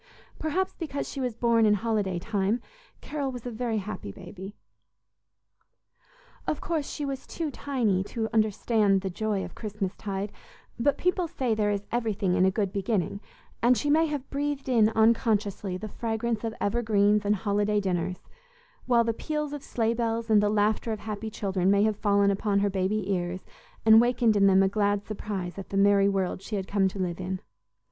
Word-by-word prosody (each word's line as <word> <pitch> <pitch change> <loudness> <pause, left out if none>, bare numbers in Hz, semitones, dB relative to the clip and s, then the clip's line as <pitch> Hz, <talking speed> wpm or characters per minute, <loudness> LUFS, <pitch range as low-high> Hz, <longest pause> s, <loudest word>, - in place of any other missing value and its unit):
Perhaps 345 +5 -1
because 300 -4 -3
she 275 - -5
was 250 -3 -2
born 235 -1 +3
in 210 -1 +5
holiday 205 -4 -1
time, 205 +3 0 0.4
Carol 285 -3 -3
was 245 -2 -8
a 245 - -3
very 230 -1 -2
happy 205 - -5
baby. 195 - -10 1.9
Of 300 - 0
course, 320 -4 -2
she 295 - -4
was 270 -1 -5
too 320 -3 -3
tiny 235 -11 0
to 220 +1 -3
understand 215 -2 +2
the 190 -1 -3
joy 210 +1 -1
of - - -10
Christmas 205 -3 -4
tide, 200 0 -4 0.5
but 280 +4 +2
people 360 -1 +1
say 255 -6 -1
there 210 -1 +1
is 205 0 -2
everything 215 -6 0
in 185 - +4
a - - +5
good 195 0 -1
beginning, 200 -1 -1 0.4
and 245 +1 +4
she 290 +7 0
may 320 +2 +4
have 290 -3 -4
breathed 285 -1 -2
in 230 -4 +4
unconsciously 220 -4 +1
the 215 - -6
fragrance 225 +1 -2
of 225 0 -3
evergreens 210 -1 +2
and 205 +1 +2
holiday 205 0 +1
dinners; 180 -2 -2 0.7
while 240 -2 +4
the 230 0 0
peals 300 +3 -3
of 290 - -5
sleigh 230 -4 0
bells 230 -1 -1
and 210 -1 +6
the 205 - +2
laughter 215 +2 +1
of 215 - -4
happy 215 0 -5
children 190 -3 0
may 200 +1 +4
have 215 -1 +2
fallen 200 -1 +3
upon 200 +1 0
her 200 0 +1
baby 195 +1 0
ears 180 0 -2 0.4
and 220 0 +8
wakened 240 -2 +3
in 200 -1 +5
them 195 0 +5
a - - +4
glad 205 0 0
surprise 200 -3 -5
at 195 - -8
the 195 - -2
merry 200 0 +5
world 190 -2 -1
she 210 +2 -5
had 195 -1 -3
come 200 -1 +2
to 190 - -5
live 180 -2 -2
in. 185 0 -3
210 Hz, 185 wpm, -27 LUFS, 195-235 Hz, 1.9 s, and